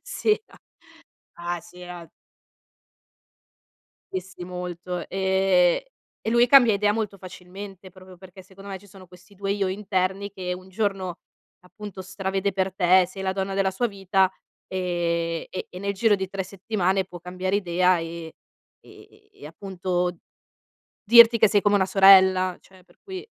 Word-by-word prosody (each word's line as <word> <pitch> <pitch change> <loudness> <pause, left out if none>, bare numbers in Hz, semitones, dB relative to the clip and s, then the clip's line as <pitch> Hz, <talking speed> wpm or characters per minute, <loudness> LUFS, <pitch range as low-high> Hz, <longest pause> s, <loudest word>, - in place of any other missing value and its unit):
si - - -2
era. 430 +1 -1 0.8
Ah 175 0 -4
sì 175 +2 -16
era 175 -2 -10 2.0
Dissi 185 -1 -6
molto, 180 -1 -6
ehm, 190 -2 +2 0.4
e - - -2
lui 240 +1 +4
cambia 245 -4 +7
idea 205 +1 +2
molto 210 -3 -3
facilmente 190 +1 -11
proprio 185 0 -15
perché 190 +1 -14
secondo 195 +2 -14
me 195 - -5
ci 205 - -19
sono 190 -1 -15
questi 180 +3 -19
2 195 0 -3
io 200 -1 0
interni 190 0 -2
che 180 -2 -4
un 185 +1 -11
giorno 190 -3 -2 0.4
appunto 200 +1 -10
stravede 190 +1 -3
per 190 0 -1
te, 185 -1 +4
sei 190 +2 -9
la 190 0 -1
donna 195 0 -3
della 195 0 +1
sua 240 +5 -1
vita, 190 -2 +1 0.4
ehm, 170 -2 -2
e 185 - -6
e 180 - -9
nel 200 +1 -2
giro 210 +1 +3
di 190 -1 -5
3 195 0 -3
settimane 190 0 -1
può 180 -1 -11
cambiare 185 +3 -2
idea, 180 -1 +2
ehm, 165 0 -7 0.5
ehm, - - -17 0.3
e - - -14
appunto 180 +1 -3 0.9
dirti 235 +1 +8
che 220 - +5
sei 205 0 +3
come 205 0 +3
una 190 -1 +2
sorella, 190 -2 +6
cioè 185 -1 -20
per - - -27
cui 380 -1 -8
190 Hz, 155 wpm, -24 LUFS, 180-200 Hz, 2.0 s, dirti